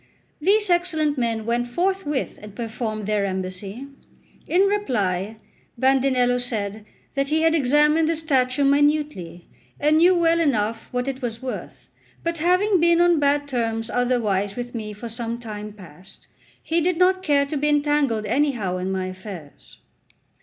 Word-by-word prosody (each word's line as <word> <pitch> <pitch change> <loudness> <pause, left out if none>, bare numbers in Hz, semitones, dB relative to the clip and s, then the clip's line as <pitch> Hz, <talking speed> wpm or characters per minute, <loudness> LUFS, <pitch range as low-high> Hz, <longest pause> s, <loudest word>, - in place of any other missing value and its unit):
These 405 +3 +2
excellent 320 -4 +1
men 225 -2 -1
went 240 +1 0
forthwith 345 -1 -2
and 210 -1 -11
performed 220 -2 -4
their 210 -1 0
embassy. 190 +5 -4 0.6
In 360 - +3
reply 220 - 0 0.4
Bandinello 260 -1 +2
said 215 -4 -3 0.3
that 275 0 0
he 315 +2 +1
had 325 0 +4
examined 300 +2 +3
the 330 - +1
statue 275 -4 +1
minutely, 285 - +1 0.3
and 300 +2 +3
knew 360 +2 +5
well 335 -1 +3
enough 225 -7 0
what 250 +1 -2
it 270 0 -4
was 235 0 -5
worth; 255 - -7 0.4
but 335 -1 -2
having 365 +4 +3
been 340 0 +4
on 345 -2 +4
bad 285 0 +1
terms 225 -3 -2
otherwise 215 -6 0
with 245 0 -6
me 215 -3 -5
for 210 +3 -8
some 230 0 -4
time 210 -3 -7
past, 185 -3 -15 0.4
he 335 +1 0
did 355 +1 +1
not 370 +1 +3
care 285 -5 +2
to 280 - -5
be 295 +1 +1
entangled 290 -7 +1
anyhow 230 -6 0
in 185 +1 -3
my 190 -1 -2
affairs. 185 -5 -10
255 Hz, 155 wpm, -23 LUFS, 215-310 Hz, 0.6 s, knew